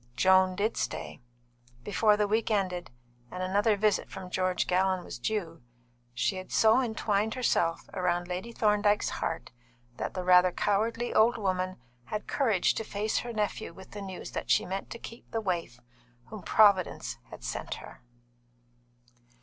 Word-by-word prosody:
Joan 185 +5 +4
did 210 +4 -1
stay. - - -4 0.6
Before 210 - +3
the 210 -1 +2
week 220 +2 +1
ended, 185 -4 -1 0.4
and 180 0 -5
another 205 +3 +2
visit 210 0 +1
from 185 -1 -8
George 185 -1 0
Gallon 185 0 +1
was 120 - -8
due, 165 - -3 0.5
she 190 - 0
had 185 - -8
so 220 +3 +5
entwined 220 -3 0
herself 170 -9 0
round 175 -1 0
Lady 180 +6 -4
Thorndyke's 210 -2 +2
heart 165 - -3 0.5
that - - -4
the 185 - -2
rather 180 0 +6
cowardly 225 +6 0
old 230 +2 +4
woman 185 -3 -1 0.3
had 210 - -4
courage 220 -10 +2
to - - -3
face 210 0 -1
her 240 - -5
nephew 210 -6 -2
with 190 +1 -13
the 205 - -7
news 190 -2 -7
that - - -5
she - - +4
meant 190 +2 -4
to 235 - -6
keep 230 0 -11
the 225 - -2
waif 175 - -3 0.5
whom 215 -2 -8
"Providence 200 -2 +3
had - - -11
sent - - -4
her." - - -12
195 Hz, 160 wpm, -29 LUFS, 185-215 Hz, 0.6 s, rather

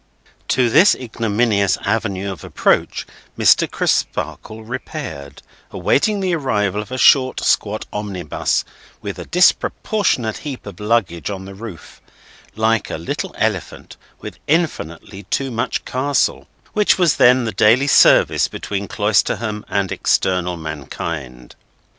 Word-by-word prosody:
To 125 -1 +2
this 175 - +5
ignominious 110 -4 0
avenue 100 -2 -1
of 95 - -9
approach, - - 0 0.3
Mr. - - +4
Crisparkle 110 0 -2
repaired, 120 - -7 0.3
awaiting 205 +7 +1
the 185 -2 0
arrival 105 - 0
of 105 - -11
a 130 - -3
short, 130 0 +4
squat 110 +1 0
omnibus, 95 -7 -2 0.4
with 100 -3 -5
a 90 - -7
disproportionate 180 - +1
heap 140 -4 -7
of 100 -4 -10
luggage 105 -6 0
on 95 -2 -6
the 100 - -9
roof—like 110 +2 -5
a - - -4
little 80 - -5
Elephant - - -3 0.3
with - - -9
infinitely 100 - -2
too 135 -1 -1
much 115 0 -2
Castle—which 145 +9 0
was 175 -5 +2
then 125 +1 +5
the 110 - -2
daily 110 +7 +4
service 145 - +5
between 100 0 -5
Cloisterham 105 0 0
and 100 -2 -1
external 90 -2 0
mankind. 75 -4 -6
105 Hz, 120 wpm, -19 LUFS, 95-130 Hz, 0.4 s, this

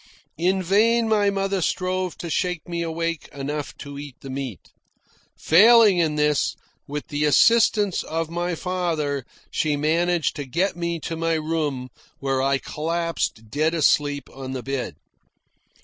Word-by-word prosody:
In 185 +2 +1
vain 225 +5 +3
my 210 -2 +3
mother 195 -1 -1
strove 185 +1 -1
to 170 - -6
shake 180 -1 -1
me 170 -1 -3
awake 165 -1 -3
enough 145 +1 -5
to 140 -1 -8
eat 145 -3 -9
the 135 - -8
meat. 130 -6 -6 0.7
Failing 210 +2 +6
in 160 -3 +1
this, 150 -1 +1 0.3
with 145 +3 -5
the 145 -1 -1
assistance 210 - +4
of 165 0 -3
my 175 +1 -2
father 160 -6 -2 0.3
she 150 -2 0
managed 165 +3 +1
to 145 - -4
get 175 +9 0
me 170 -1 -2
to 165 - -4
my 165 0 0
room, 155 -5 -2 0.3
where 135 -1 -1
I 135 0 +2
collapsed 160 -8 -3
dead 155 +3 +1
asleep 145 -2 +2
on 130 -1 -6
the 130 -2 -5
bed. 135 -1 -3
165 Hz, 150 wpm, -23 LUFS, 145-180 Hz, 0.7 s, Failing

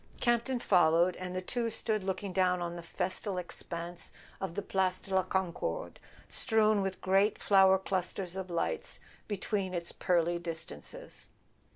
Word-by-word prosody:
Campton 240 +2 +2
followed, 175 -3 +4
and 185 0 -5
the 185 - -2
two 235 +4 -1
stood 220 -2 0
looking 190 0 -3
down 180 -1 +3
on 175 0 -3
the 170 - -6
festal 185 +3 -2
expanse 175 -1 -6 0.3
of 190 -3 -4
the 205 - -2
Place 185 -1 +1
de 195 - -7
la 190 - +5
Concorde 190 - -2 0.3
strown 215 -3 +3
with 195 -1 -3
great 195 +3 +3
flower 190 -1 +6
clusters 185 -1 -2
of 190 -1 -4
lights 470 - -2 0.3
between 195 -2 -1
its 170 0 -1
pearly 175 -1 +1
distances. 170 - -5
190 Hz, 150 wpm, -32 LUFS, 175-205 Hz, 0.3 s, flower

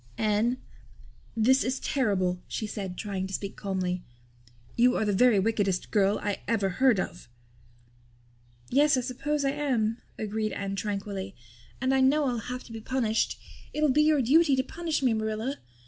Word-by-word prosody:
"Anne, 220 +3 +1 0.8
this 260 +5 +4
is 260 +1 -1
terrible," 185 -9 0
she 220 - -3
said, 195 -4 -5
trying 195 -3 -3
to 190 - -9
speak 200 0 -5
calmly. 185 -2 -2 0.7
"You 245 +1 +4
are 220 - +1
the 205 - +1
very 240 +2 +5
wickedest 195 -2 0
girl 205 -1 +3
I 205 -1 -1
ever 210 -4 +1
heard 235 +3 +3
of." 175 -8 -5 1.4
"Yes, 285 +1 +4
I - - +1
suppose 280 +4 -2
I 275 - +2
am," 245 -6 0 0.2
agreed 215 0 -2
Anne 195 0 -3
tranquilly. 195 -1 -4 0.4
"And 260 +1 +1
I 265 - +3
know 285 +3 +4
I'll 245 -3 0
have 250 0 -4
to - - -14
be 225 - -6
punished. 225 -2 0 0.4
It'll 300 0 +2
be 300 +3 +4
your 300 -3 +4
duty 290 +3 +5
to 260 - +1
punish 320 +1 -3
me, 250 -3 +3
Marilla. 220 +5 -2
225 Hz, 165 wpm, -28 LUFS, 200-265 Hz, 1.4 s, very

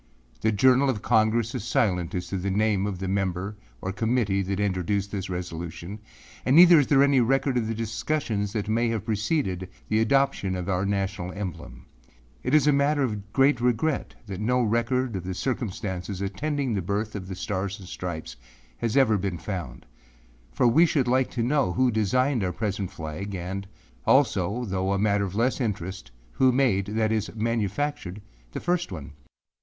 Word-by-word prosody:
â 110 - +3
âThe - - -2
Journal 130 +5 +5
of 110 -5 -2
Congress 110 +1 +2
is 125 -6 -3
silent 95 - 0
as 90 0 -2
to 95 - -2
the 95 +2 -2
name 100 0 +1
of 100 -3 -3
the 95 +1 -4
member 95 +1 -1 0.3
or 95 - -3
committee 110 -1 +1
that 95 +1 -2
introduced 100 0 -1
this 95 -2 -4
resolution 90 +2 -5 0.4
and 130 - +3
neither 170 -1 +9
is 140 - +2
there 140 -1 +5
any 140 -2 +4
record 135 +2 +1
of 115 -3 0
the 115 - -2
discussions 110 -2 -2
that 105 -2 -2
may 115 +2 +1
have 110 -3 -2
preceded 105 - -1 0.2
the 110 - +2
adoption 115 -5 +2
of 90 -1 -4
our 95 0 0
national 95 -2 -2
emblem.â - - -9
âIt 145 - +3
is 155 - +5
a 150 - +5
matter 140 +1 +2
of 105 -4 -3
great 135 -1 +3
regret 125 +5 0
that 100 -3 -6
no 125 +4 +2
record 120 +2 0
of 95 - -4
the 95 0 -4
circumstances 100 -6 -3
attending 135 +7 -2
the 100 - 0
birth 105 +4 -2
of 95 -3 -6
the 95 - -5
Stars 95 +1 -3
and 95 - -11
Stripes 85 -3 -6 0.4
has 115 +2 0
ever 110 -7 +4
been 95 -2 -2
found,â 85 -10 -6 0.7
for - - +2
we 135 +9 +5
should 140 -5 +1
like 130 +1 +2
to 120 - -2
know 130 -6 +1
who 125 +6 +2
designed 120 +3 +1
our 90 - 0
present 100 -2 -3
flag, 85 +6 -6
and 95 +2 -5 0.4
also, 120 +5 +2
though 95 -1 -1
a - - +1
matter 100 0 +2
of 95 0 -6
less 125 +5 +1
interest, 95 - -3 0.2
who 130 - +3
made, 120 -7 +2
that 110 +1 0
is 110 -1 0
manufactured, 110 -1 -2 0.3
the - - -3
first 175 - -1
one. 75 -5 -7
105 Hz, 185 wpm, -26 LUFS, 95-125 Hz, 0.7 s, neither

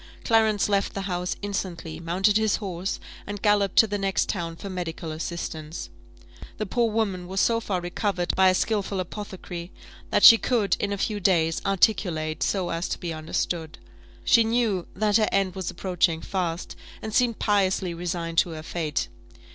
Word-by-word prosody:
Clarence 220 -3 +3
left 200 -1 0
the 195 - -2
house 180 -2 -2
instantly, 175 -5 -4
mounted 185 +5 +1
his 220 -1 +3
horse, 190 -3 -4 0.3
and 205 -1 -6
galloped 205 -2 +3
to - - +7
the 205 -1 -3
next 195 -1 0
town 170 -4 -3
for 200 - -8
medical 175 -3 -5
assistance. 155 - -5 0.7
The 215 - -2
poor 235 +4 +1
woman 200 -5 -1
was 190 +1 -2
so 230 +2 +3
far 200 -5 -2
recovered 180 +1 -1
by 190 0 +6
a 185 - +3
skilful 200 -2 0
apothecary, 180 -2 -6 0.4
that - - +2
she 230 - +11
could, 225 -6 +1
in 200 - -1
a 200 - -1
few 210 +1 -1
days, 165 -4 +2
articulate 180 -6 +1
so 185 -3 0
as 165 +2 -2
to - - -2
be 170 -2 -4
understood. 160 +1 -3 0.5
She 230 - +6
knew 225 -5 0
that 210 +2 +3
her 215 - +2
end 195 -2 +1
was 190 -2 -4
approaching 175 -3 0
fast, 175 -2 -3 0.3
and 220 - -5
seemed 240 -2 +2
piously 190 -3 +1
resigned 170 -1 -1
to - - +2
her 155 - -7
fate. 155 - -2
190 Hz, 170 wpm, -25 LUFS, 170-205 Hz, 0.7 s, she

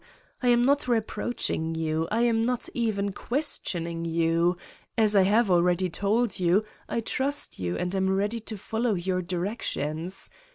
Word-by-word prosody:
I 250 - 0
am 240 0 +5
not 280 +1 +2
reproaching 220 -7 -1
you. 160 0 -1
I 225 +2 +2
am 230 -2 +3
not 245 +1 0
even 205 -4 -1
questioning 175 - -1
you: 165 +1 +1 0.4
as 215 -2 +4
I 195 - +7
have 205 +2 +3
already 180 +1 +3
told 205 +3 0
you, 180 +4 +3 0.3
I 230 - -1
trust 280 +5 -1
you 90 -1 -2
and 180 +1 -2
am 190 -1 +1
ready 205 +4 0
to 220 -1 -7
follow 225 +2 -1
your 185 +1 -1
directions. 180 -2 -3
195 Hz, 155 wpm, -27 LUFS, 175-230 Hz, 0.4 s, I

